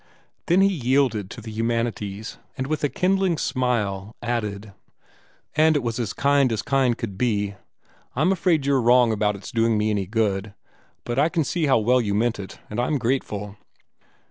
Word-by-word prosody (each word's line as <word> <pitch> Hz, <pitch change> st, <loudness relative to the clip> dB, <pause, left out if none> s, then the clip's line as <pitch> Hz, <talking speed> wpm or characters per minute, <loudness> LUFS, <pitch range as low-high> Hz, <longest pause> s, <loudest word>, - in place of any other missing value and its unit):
Then 180 Hz, +3 st, +4 dB
he 195 Hz, -, +6 dB
yielded 125 Hz, -, +1 dB
to 115 Hz, -, -9 dB
the 110 Hz, 0 st, -8 dB
humanities, 115 Hz, -2 st, -3 dB, 0.2 s
and 130 Hz, -, -2 dB
with 155 Hz, +2 st, -2 dB
a 145 Hz, -, +2 dB
kindling 185 Hz, 0 st, +1 dB
smile 110 Hz, -7 st, -1 dB
added, 105 Hz, -4 st, -3 dB, 0.8 s
"And 155 Hz, 0 st, +4 dB
it 145 Hz, -, 0 dB
was 115 Hz, 0 st, -2 dB
as 115 Hz, -4 st, -2 dB
kind 140 Hz, -2 st, +2 dB
as 110 Hz, -1 st, -2 dB
kind 130 Hz, -4 st, +1 dB
could 100 Hz, -5 st, -6 dB
be. 105 Hz, -4 st, 0 dB, 0.6 s
I'm 155 Hz, +8 st, +2 dB
afraid 170 Hz, -6 st, +1 dB
you're 140 Hz, -2 st, +2 dB
wrong 120 Hz, 0 st, +5 dB
about 105 Hz, -1 st, +1 dB
it's 100 Hz, -, -9 dB
doing 115 Hz, -1 st, +2 dB
me 105 Hz, +1 st, +1 dB
any 100 Hz, -3 st, -1 dB
good, 105 Hz, -2 st, -1 dB, 0.5 s
but 120 Hz, +2 st, -2 dB
I 150 Hz, +3 st, +4 dB
can 165 Hz, -2 st, 0 dB
see 150 Hz, +3 st, -1 dB
how 135 Hz, -, +4 dB
well 125 Hz, +3 st, +3 dB
you 100 Hz, -3 st, -1 dB
meant 115 Hz, 0 st, +1 dB
it, 95 Hz, -, -8 dB
and 105 Hz, -, -5 dB
I'm 135 Hz, +5 st, +1 dB
grateful." 110 Hz, -5 st, -2 dB
120 Hz, 180 wpm, -23 LUFS, 105-140 Hz, 0.8 s, he